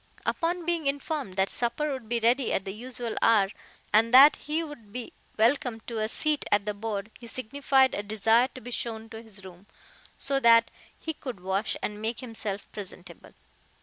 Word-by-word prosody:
Upon 345 0 -1
being 335 -4 0
informed 280 -6 -2
that 190 0 +1
supper 270 +5 0
would 250 -5 -8
be 235 0 +1
ready 240 +3 +2
at 190 - -1
the 195 - -5
usual 240 0 -5
hour, 210 -4 +4 0.4
and 225 +2 +4
that 270 +4 +9
he 310 +3 -2
would 275 -10 -11
be 245 +1 -7 0.2
welcome 235 0 +2
to 230 0 -5
a 215 0 -1
seat 300 +3 +1
at 205 -1 +3
the 210 - -1
board, 210 0 -4
he 235 - -11
signified 265 +2 +1
a - - -2
desire 220 +3 +3
to 255 - -8
be 245 - -9
shown 225 -2 -3
to 220 0 -8
his 210 -4 -15
room, 185 +2 -13 0.5
so 275 0 0
that 230 -2 +5 0.3
he 320 - -4
could 255 -9 -7
wash 190 +3 -1
and 210 0 -3
make 225 +2 -2
himself 220 -5 -4
presentable. 180 -4 -9
230 Hz, 185 wpm, -27 LUFS, 210-265 Hz, 0.5 s, that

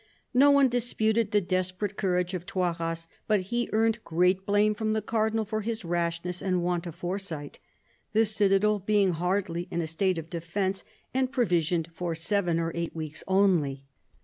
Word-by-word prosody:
No 275 +3 +6
one 280 -1 +6
disputed 230 -3 +1
the 210 0 +3
desperate 185 +2 -2
courage 180 -2 0
of 180 -1 -5
Toiras; 165 -3 -2 0.2
but 215 -2 +3
he 240 +6 -2
earned 225 +1 +1
great 180 +3 +1
blame 205 +1 +3
from 215 +1 -1
the 220 - 0
Cardinal 220 0 0
for 215 +1 -2
his 220 -2 -3
rashness 170 +1 -2
and 185 -2 0
want 175 0 -1
of 165 - -7
foresight; 175 -5 -5 0.5
the 220 +1 +4
citadel 210 0 +3
being 200 -1 +2
hardly 175 0 -1
in 170 - -2
a 165 - 0
state 175 +3 0
of 165 -1 -5
defence, 190 +3 -2 0.3
and 260 0 +1
provisioned 170 -7 +1
for 170 -1 -3
seven 170 0 0
or 165 0 -1
eight 170 -1 -3
weeks 155 -1 -6
only. 175 -9 +2
185 Hz, 170 wpm, -28 LUFS, 170-215 Hz, 0.5 s, No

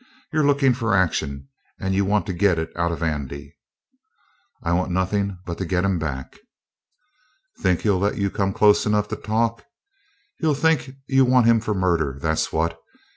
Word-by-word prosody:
You're 155 0 +2
lookin' 140 -2 +3
for 115 -3 0
action, 70 -7 0 0.3
and 95 0 -1
you 100 +1 +2
want 105 +1 +1
to 95 - -3
get 90 -1 +2
it 80 0 -3
out 85 0 0
of 85 0 -4
Andy." 70 -3 -4 1.1
"I 85 - 0
want 90 +2 0
nothin' 95 +2 -1
but 85 -2 -5
to 95 - -2
get 90 +1 0
him 95 -3 +1
back." 70 -4 -5 1.2
"Think 90 -3 +1
he'll 100 -4 +2
let 100 +2 0
you 100 -1 0
come 100 -2 0
close 105 +1 +4
enough 105 0 +1
to - - -2
talk? 115 +2 -1 0.8
He'll 155 -3 +1
think 150 -3 +1
you 135 -1 +4
want 125 -2 +4
him 115 -1 +5
for 110 -1 -2
murder, 85 -7 0
that's 80 +2 -1
what. 80 +1 -1
95 Hz, 180 wpm, -23 LUFS, 85-110 Hz, 1.2 s, him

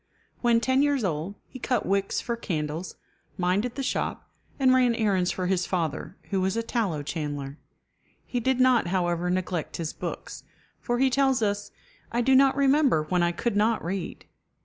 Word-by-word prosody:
When 235 -1 +4
ten 260 +3 +2
years 285 -4 +2
old, 170 +2 -2
he 255 - -11
cut 250 +1 0
wicks 195 0 0
for 235 - -2
candles, 160 -5 -4 0.4
minded 190 +7 0
the 275 - -3
shop, 265 - -3 0.3
and 260 -1 +5
ran 250 -2 +4
errands 195 -5 +1
for 185 - -2
his 180 -1 0
father, 165 0 -2
who 195 -1 +1
was 190 +3 0
a 230 - 0
tallow 205 - -1
chandler. 145 -1 -4 0.7
He 245 - -2
did 260 +2 +1
not, 255 -6 +4
however, 175 -1 0
neglect 180 -2 -2
his 165 -2 -3
books, - - -6 0.4
for 240 -1 -1
he 265 +1 +3
tells 265 -2 +2
us, 205 0 -1 0.4
"I 240 - +1
do 265 +2 +3
not 270 0 +5
remember 275 - +4
when 180 -1 +2
I 175 0 +2
could 205 +5 -2
not 220 0 +2
read." 180 0 -4
200 Hz, 175 wpm, -26 LUFS, 175-250 Hz, 0.7 s, and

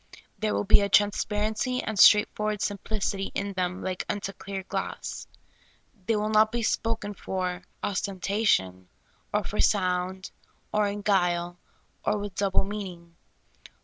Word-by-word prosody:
There 215 -1 0
will - - 0
be 205 +1 +6
a 200 - 0
transparency 215 +4 +1
and 220 -3 -3
straightforward 210 0 +5
sim 205 -1 -2
plicity 200 -2 -2
in 200 0 -2
them 180 0 -2
like 185 -1 -2
unto 200 -1 -3
clear 195 0 -6
glass. - - -5 0.8
The}' 225 - +3
will 210 0 0
not 215 0 +5
be 235 0 -2
spoken 220 -2 -1
for 185 -1 -3 0.2
ostentation, 185 - 0 0.4
or - - +1
for - - -5
sound, 185 -2 0 0.4
or 210 -1 +3
in 205 0 -4
guile, 175 -3 +1 0.4
or - - +1
with 205 -1 -5
double 195 0 +1
meaning. 185 -4 -7
200 Hz, 140 wpm, -27 LUFS, 185-210 Hz, 0.8 s, be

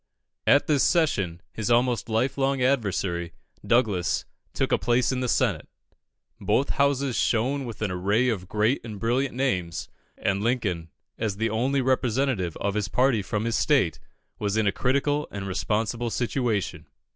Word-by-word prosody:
At 140 - +5
this 145 -3 +2
session, 100 - +1
his 110 0 -3
almost 120 -1 +2
life 115 +4 +1
long 135 0 +1
adversary, 95 -10 0 0.3
Douglas, 105 -7 +1 0.3
took - - -1
a - - +3
place 120 +1 +2
in 130 - -1
the 125 - -1
Senate. - - +1 0.7
Both 140 - +1
houses 140 -3 +1
shone 130 +4 +1
with 115 -2 -6
an 105 - -1
array 100 +7 +1
of 100 -7 -2
great 110 +5 +1
and 110 -4 -7
brilliant 125 +4 0
names, 90 -11 -1 0.3
and 95 +1 0
Lincoln, 105 -9 -1 0.3
as 105 -3 -2
the 110 +1 0
only 130 +5 +1
representative 125 - 0
of 100 0 -1
his 105 -2 -1
party 125 -1 +2
from 105 +3 -2
his 115 -1 0
state, - - +2 0.4
was 105 0 -1
in 110 - +2
a 100 - +3
critical 140 +6 0
and 100 -1 -6
responsible 110 +5 -1
situation. 110 - -1
115 Hz, 155 wpm, -26 LUFS, 100-130 Hz, 0.7 s, At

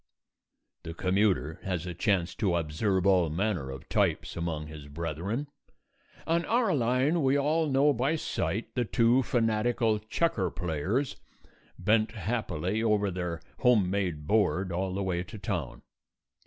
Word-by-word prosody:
The 80 - -7
commuter 90 -5 +1
has 90 -3 -3
a 90 - -4
chance 90 0 0
to 95 -6 +1
observe 85 +4 0
all 90 -4 +4
manner 85 -4 -1
of 65 0 -8
types - - 0
among 85 -3 -3
his 75 -1 -10
brethren. 85 - -3 0.8
On 170 +1 +1
our 230 -4 +2
line 130 +6 +2
we 135 0 +3
all 155 +2 +1
know 140 +2 +4
by 135 +6 +1
sight 115 -7 -2
the 125 - +1
two 120 +2 +3
fanatical 115 -2 +1
checker 110 - 0
players, 90 - -2 0.6
bent 110 +1 +2
happily 105 -2 -2
over 105 -3 +2
their 90 -2 -4 0.2
homemade 95 - +2
board 100 -1 +1
all 95 +2 -2
the 100 - -1
way 90 -2 -1
to 100 +5 -8
town. 90 - -4
100 Hz, 140 wpm, -29 LUFS, 85-120 Hz, 0.8 s, all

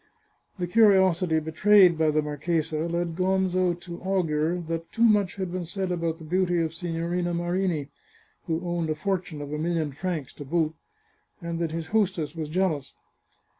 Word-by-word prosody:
The 180 - -1
curiosity 185 -5 +4
betrayed 180 +3 +5
by 160 -1 +2
the 155 0 +1
marchesa 155 +2 -1
led 170 0 -1
Gonzo 185 -1 +1
to 175 -1 -8
augur 175 -3 0
that 165 0 -4
too 230 - 0
much 205 -5 +4
had 190 -3 -4
been 185 0 -3
said 185 +2 -3
about 165 -2 -1
the 160 - -12
beauty 175 +2 +1
of 160 -1 -1
Si 175 +2 -6
gnorina 175 +1 -1
Marini, 175 -3 -1 0.6
who 165 +1 -2
owned 170 -2 -1
a 155 - 0
fortune 175 -3 -3
of 145 +1 -7
a 150 - -2
million 160 -2 -1
francs 155 -1 -4
to 145 - -8
boot, 160 +2 0 0.7
and 170 -2 -4
that 170 -1 0
his 165 0 -3
hostess 185 -8 0
was 155 -2 -4
jealous. 160 -5 -1
170 Hz, 170 wpm, -26 LUFS, 160-185 Hz, 0.7 s, betrayed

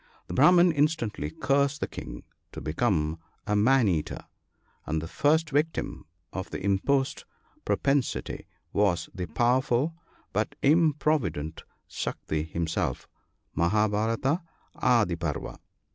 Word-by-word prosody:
The - - -7
Brahman 175 +5 +6
instantly 145 - 0
cursed 140 - +1
the - - -2
King - - -8 0.3
to - - -6
become 80 -3 0 0.3
a 105 - 0
man 120 +3 +4
eater, 80 -5 -2 0.6
and 80 - 0
the 80 - -5
first 155 - +2
victim 150 - -1 0.3
of 95 -1 -4
the - - -5
imposed 100 +8 +1 0.4
propensity 140 -2 0 0.3
was 95 -5 +1
the 90 -2 -4
powerful 125 - +1 0.4
but 105 +3 -1
improvident 145 - +2 0.3
Saktri 80 +1 -3
himself 85 0 -2 0.5
{Mahabharata^ 110 - +1 0.3
Adi 115 -8 +2
Parva). 85 -4 -4
110 Hz, 110 wpm, -27 LUFS, 85-140 Hz, 0.6 s, Brahman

